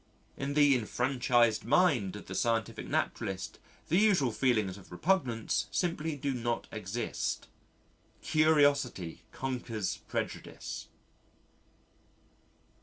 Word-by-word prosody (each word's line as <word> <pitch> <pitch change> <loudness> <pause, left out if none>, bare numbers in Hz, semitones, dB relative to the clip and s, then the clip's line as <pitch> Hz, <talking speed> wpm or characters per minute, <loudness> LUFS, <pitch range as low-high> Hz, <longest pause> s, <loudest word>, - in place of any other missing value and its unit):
In 140 +1 -3
the 145 -2 +6
enfranchised 120 -1 +2
mind 125 - +3
of 105 - -8
the - - -7
scientific 115 -2 0
naturalist, 95 -1 -2 0.3
the 175 - +3
usual 190 - +4
feelings 110 -6 +1
of 100 -2 -14
repugnance 120 - 0
simply 165 -3 -1
do 140 0 -2
not 120 -1 -2
exist. 110 +2 -3 0.8
Curiosity 145 - +2
conquers 120 -6 -3
prejudice. - - -4
125 Hz, 95 wpm, -31 LUFS, 110-145 Hz, 0.8 s, the